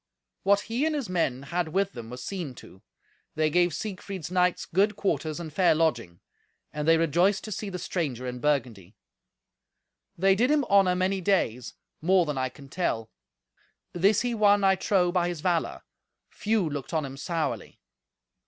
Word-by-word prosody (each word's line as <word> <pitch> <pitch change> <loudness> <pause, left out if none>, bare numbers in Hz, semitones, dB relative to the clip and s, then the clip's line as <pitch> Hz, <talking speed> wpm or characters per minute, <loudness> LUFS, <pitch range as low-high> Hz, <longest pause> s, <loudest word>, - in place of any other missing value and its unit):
What 200 +1 +3
he 235 +6 -2
and 315 - -1
his 275 -8 -3
men 140 -8 0
had 170 +4 -2
with 195 +4 0
them 115 -2 -8
was 125 +1 -8
seen 175 -10 -5
to; 95 -4 -14 0.5
they 155 0 +1
gave 175 +1 +3
Siegfried's 185 -1 -6
knights 180 -1 +1
good 200 +4 +1
quarters 165 -6 -1
and 160 -3 -7
fair 180 -1 +4
lodging; 120 - -1 0.5
and 150 0 -3
they 165 0 +6
rejoiced 175 +5 +2
to 215 - -7
see 210 0 -4
the 180 - -5
stranger 145 -9 -3
in 125 0 -5
Burgundy. 120 -10 -1 1.2
They 195 +3 +4
did 235 +7 +2
him 300 -1 +3
honour 195 -5 +4
many 190 +1 0
days: 145 - 0 0.3
more 180 +2 +4
than 150 -2 -3
I 130 0 0
can 140 +2 -14
tell. 115 -9 -2 0.8
This 190 +4 +3
he 245 -1 -1
won, 205 -2 +4
I 195 0 +5
trow, 185 -2 +1
by 175 -1 +1
his 175 -3 -4
valour. 175 -2 -1 0.5
Few 215 -4 0
looked 145 0 -5
on 155 -2 0
him 135 0 -7
sourly. 165 +3 -3
175 Hz, 170 wpm, -27 LUFS, 145-195 Hz, 1.2 s, they